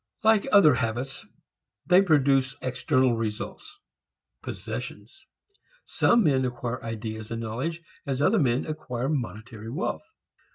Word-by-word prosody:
Like 220 -2 +4
other 165 -8 +7
habits 125 +2 -3 0.6
they 180 +2 +6
produce 140 -7 +3
external 130 0 +1
results, 115 - -5 0.6
possessions. 390 - -7 0.6
Some 235 -1 +3
men 135 -5 +3
acquire 125 -1 -3
ideas 110 -1 -5
and 115 0 -4
knowledge 140 +10 -4 0.2
as 135 -2 -1
other 190 +10 +3
men 125 -4 +1
acquire 135 -5 -4
monetary 115 -5 -4
wealth. 185 - -4
130 Hz, 115 wpm, -26 LUFS, 115-155 Hz, 0.6 s, other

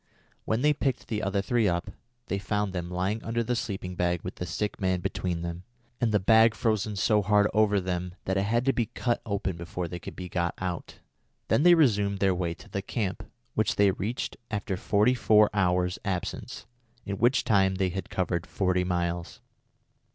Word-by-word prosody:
When 115 +4 0
they 150 0 +5
picked 135 -3 -2
the 110 -2 -1
other 100 0 0
three 115 0 +2
up, 85 -1 -1 0.3
they 100 - -2
found 105 -1 -1
them 85 -1 -3
lying 95 +5 -2
under 115 +1 -1
the 125 +1 -1
sleeping 95 -5 -4
bag 90 -1 0
with 90 - -6
the 90 - -4
sick 105 +6 -3
man 95 -1 +1
between 90 -2 -2
them, 85 0 -4 0.4
and 115 -3 +2
the 105 - +3
bag 110 +3 +5
frozen 110 -2 0
so 105 +2 +3
hard 105 +1 +4
over 105 -2 +3
them 90 -1 -3
that 95 - 0
it 95 - +2
had 120 +2 +1
to 135 - +3
be 115 -3 0
cut 120 +2 -1
open 95 -4 -2
before 85 +1 -4
they 85 +1 -6
could - - -9
be 90 - -6
got 85 -1 -1
out. 90 -2 -5 0.5
Then - - +3
they 175 +2 +7
resumed 105 -10 +3
their 95 -1 +2
way 85 -2 -2
to - - -15
the 100 - -3
camp, 100 -2 -3 0.2
which - - +1
they 100 -1 +4
reached 105 +6 -4
after 100 -3 -2
forty 105 +4 +2
four 110 -3 +4
hours' 90 -2 +1
absence, 95 -3 -4 0.4
in 100 -1 -4
which 125 +3 +3
time 95 -3 +3
they 95 -1 +1
had 95 +2 -5
covered 90 -2 -1
forty 90 -2 +1
miles. 85 -1 -2
95 Hz, 195 wpm, -28 LUFS, 90-110 Hz, 0.5 s, they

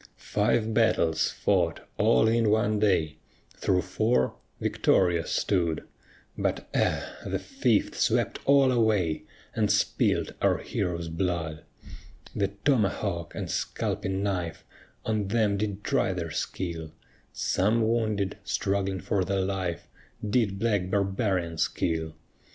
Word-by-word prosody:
Five 110 +1 0
battles 95 -8 +2
fought - - 0
all 65 - +4
in 115 -1 +3
one 105 0 +2
day, 90 -7 +1 0.4
Through 90 -1 +1
four 100 - +1 0.3
victorious 85 -3 +2
stood, 85 -5 0 0.5
But - - -2
ah! - - 0
the - - -2
fifth - - 0
swept - - +1
all 140 -1 +5
away, 105 -9 +1 0.3
And 105 -2 +1
spilt 105 +1 +1
our - - +3
heroes' 85 -3 -3
blood. 80 -3 -2 0.7
The 100 -1 +1 0.2
tomahawk 100 - 0
and - - -3
scalping 95 +1 -2
knife 90 -5 -2 0.4
On 105 -3 0
them 105 -1 +2
did 100 0 -3
try 95 - +1
their 85 -3 -4
skill; 80 -1 -4 0.4
Some 110 +4 +1
wounded, 110 -4 0
struggling 95 -1 -1
for 100 -2 0
their 95 +1 0
life, 95 -3 -2 0.4
Did 105 -3 +1
black 100 -4 0
barbarians 95 -4 0
kill. 80 -1 -2
95 Hz, 115 wpm, -27 LUFS, 85-110 Hz, 0.7 s, all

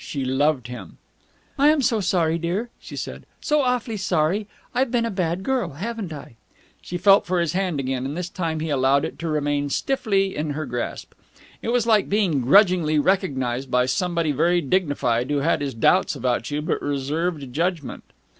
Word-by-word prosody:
She 140 -3 -4
loved 135 0 +1
him. 125 0 -9 0.6
"I'm 295 0 +4
so 235 -3 +2
sorry, 170 -4 +1
dear," 190 +8 -2
she - - -10
said. - - -6
"So 300 0 +1
awfully 250 -4 -1
sorry! 190 +2 0 0.3
I've 260 0 +1
been 235 -1 +1
a 230 - -2
bad 180 -1 -1
girl, 245 - -1
haven't 205 +3 -5
I?" 140 -6 -9 0.4
She 175 - -5
felt 195 +2 +5
for 180 0 +1
his 170 -2 0
hand 180 -5 -1
again, 130 -1 -2
and 145 +4 -5
this 180 -1 -3
time 165 -3 -3
he 160 -1 -2
allowed 140 +1 +3
it - - -7
to 170 - -3
remain 145 -1 0
stiffly 195 - 0
in 150 +1 -2
her 155 - -3
grasp. 120 -2 -5 0.5
It - - -3
was 240 -1 +2
like 220 -3 +3
being 195 -9 +1
grudgingly 175 - +4
recognized 135 -8 0
by 125 0 +3
somebody 170 +4 0
very 170 +5 +2
dignified 140 -7 0
who 145 -1 +1
had 160 +1 +1
his 140 -4 -3
doubts 180 +10 +3
about 125 -3 -1
you 150 +1 -2
but - - -1
reserved 145 0 -2
judgment. 165 -1 -2
165 Hz, 185 wpm, -23 LUFS, 140-195 Hz, 0.6 s, felt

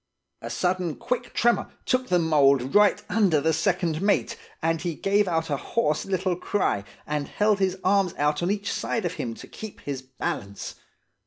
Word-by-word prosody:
A - - -6
sudden 180 -3 0
quick 245 0 -3
tremor 240 0 +2 0.2
took 255 0 +1
the 180 - +3
mould 140 -5 +3
right 205 0 +5
under 195 -8 +3
the 160 +2 +1
second 170 -1 0
mate, 200 +1 +1 0.2
and 165 0 0
he 175 -3 -2
gave 200 +3 +2
out 165 -2 -1
a 140 - +1
hoarse 155 - -1
little 185 -1 0
cry, 180 - 0 0.2
and 150 -1 -2
held 210 -1 +2
his 190 -1 +1
arms 195 -2 +2
out 150 +1 +1
on 175 - 0
each 205 0 -1
side 225 -5 -2
of 175 - -1
him, 115 -2 -4
to - - -10
keep 220 -2 -9
his 140 -2 -4
balance. 100 -6 -5
180 Hz, 180 wpm, -25 LUFS, 150-200 Hz, 0.2 s, right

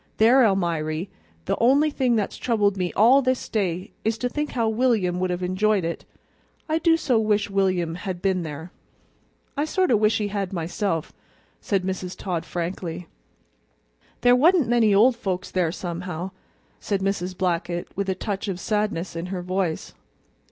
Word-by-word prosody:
"There, 245 +4 +6
Almiry, 170 -4 0 0.4
the - - 0
only 280 +6 +4
thing 255 -4 +1
that's 210 -3 -1
troubled 210 -5 +1
me 180 -2 -2
all 245 +6 +6
this 255 -1 -1
day 185 -4 -2
is 220 +1 0
to 245 +2 -1
think 295 +3 -3
how 230 -3 +1
William 220 -6 +1
would 185 0 0
have 180 0 -2
enjoyed 190 +1 +1
it. 170 - -4 0.6
I 315 0 +1
do 330 0 +4
so 260 -8 +1
wish 210 -2 +1
William 185 -4 +1
had 180 0 -5
been 185 -1 0
there." 160 +2 -7 0.8
"I 290 +1 0
sort 370 0 +1
of 220 - +4
wish 215 +1 +3
he 210 -1 -2
had, 200 -2 -3
myself," 170 -1 -2 0.5
said 195 -3 -1
Mrs. 185 -1 -4
Todd 175 -4 -3
frankly. 175 -1 -4 1.1
"There 245 0 +6
wa'n't 320 +1 +4
many 230 -3 +3
old 230 +6 +5
folks 195 -5 -3
there, 180 -3 +1
somehow," 180 0 -5 0.5
said 200 -2 -2
Mrs. 185 -2 -2
Blackett, 175 -1 -1
with 200 0 -2
a 190 - 0
touch 200 +1 -4
of 185 -3 -3
sadness 210 -5 -1
in 165 +2 -4
her 185 -1 -4
voice. 180 -2 -2
195 Hz, 165 wpm, -24 LUFS, 180-225 Hz, 1.1 s, There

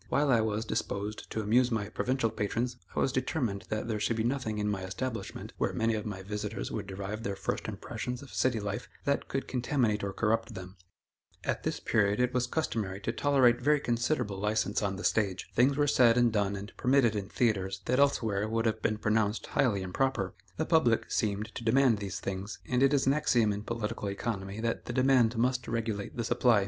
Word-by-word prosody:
While 145 -1 +2
I 115 -3 +5
was 110 0 -1
disposed 105 0 -3
to 110 - -2
amuse 120 +4 +3
my 110 -4 -1
provincial 125 -2 0
patrons, 115 +4 -2 0.2
I - - 0
was 135 - +2
determined 130 - -1
that 110 +1 -2
there 110 -2 -1
should 115 +2 0
be 110 - +1
nothing 120 -3 -1
in 105 0 -1
my 100 -2 -1
establishment, 110 +6 -5
where - - 0
many 115 0 +1
of 110 0 -3
my 95 -2 -5
visitors 105 +1 -4
would 105 -3 -4
derive 100 +3 -5
their 100 -3 -3
first - - -3
impressions 125 +1 -5
of 140 - -13
city 125 -3 +1
life, 100 -1 -4 0.2
that 140 0 0
could 135 - -3
contaminate 120 -4 0
or 100 - -1
corrupt 115 +2 0
them. 95 +1 -8 0.7
At - - -1
this - - -2
period, 105 -1 +2
it 125 0 +2
was 125 -1 +1
customary 110 -10 -2
to - - -1
tolerate 130 -4 +3
very 150 +3 +4
considerable 120 -4 -1
license 105 0 0
on 100 -2 -1
the 95 - -7
stage. 100 -4 0
Things 135 +3 +3
were 145 - +3
said 125 -4 +5
and 120 -2 +4
done 100 -2 +1
and 100 +2 -8
permitted 125 -4 +3
in 100 -1 -3
theatres 95 -5 0
that 125 +2 +1
elsewhere 110 -7 +2
would 115 +1 0
have 110 -1 0
been 110 - +1
pronounced 110 0 +1
highly 100 -7 +1
improper. 95 0 -1 0.2
The - - 0
public 125 -9 +2
seemed 105 +1 -1
to - - -6
demand 120 -1 +4
these 95 -2 -4
things, 95 +2 -4
and 125 0 +1
it 135 0 +5
is 140 -2 +2
an 135 - +4
axiom 120 -8 +2
in 100 - -4
political 115 -1 -3
economy, 100 0 -4
that 115 0 -2
the 120 - -4
demand 130 -3 +4
must 125 +1 +1
regulate 110 -3 -3
the 120 - 0
supply. 115 -1 +3
115 Hz, 205 wpm, -30 LUFS, 105-125 Hz, 0.7 s, I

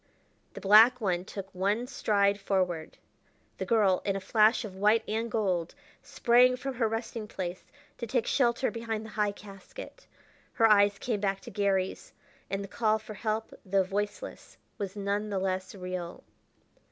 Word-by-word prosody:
The - - -7
black 220 +5 +7
one 185 -5 -1
took 195 -1 -8
one 200 +6 0
stride 205 -5 +1
forward; 185 -5 -1 0.6
the - - -3
girl, 205 -5 +3
in 195 - 0
a - - -1
flash 215 +4 +3
of 195 -3 -8
white 210 +3 +3
and 225 +2 -2
gold, 185 -7 -1 0.3
sprang 250 +1 +4
from 270 +1 -4
her 235 -2 +1
resting 225 0 -4
place 185 -3 -5 0.4
to 235 - -4
take 240 0 0
shelter 245 -1 +1
behind 225 -2 -4
the 220 - -10
high 210 -1 0
casket. 200 - -12 0.5
Her 225 - +4
eyes 205 -1 +5
came 225 -4 -2
back 195 -1 -1
to - - -10
Garry's, 195 -2 -1 0.4
and 195 0 -2
the - - -7
call 215 +2 +1
for 220 0 -10
help 215 +1 -3
though 195 0 +2
voiceless 205 - -5 0.2
was 200 -1 -4
none 205 +1 -2
the 200 - -2
less 190 0 -2
real. 180 -2 -6
205 Hz, 165 wpm, -29 LUFS, 195-225 Hz, 0.6 s, black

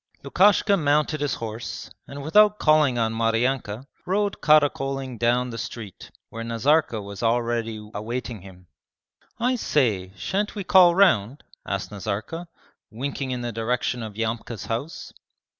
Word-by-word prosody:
Lukashka 200 +7 +4
mounted 150 -1 +1
his 145 -3 0
horse, 115 0 -6 0.2
and 140 0 -8
without 210 +7 +5
calling 155 -7 +3
on 115 -1 0
Maryanka, 115 +1 0 0.2
rode 200 +2 0
caracoling 135 -4 +2
down 120 +1 +1
the 115 - -6
street, 105 -3 -8 0.2
where 115 0 -6
Nazarka 115 +2 +1
was 100 -1 -8
already 115 -2 -1
awaiting 115 0 -5
him. 90 -1 -14 0.7
'I 250 +2 +1
say, 110 - 0
shan't 200 - -2
we 200 - -4
call 180 -2 +6
round?' 140 - +3 0.2
asked 100 0 -3
Nazarka, 110 - -4 0.4
winking 135 +3 -4
in 125 -1 -3
the 120 0 -3
direction 120 +2 -1
of 110 -2 -7
Yamka's 115 0 -3
house. 125 +8 -5
125 Hz, 135 wpm, -24 LUFS, 115-150 Hz, 0.7 s, call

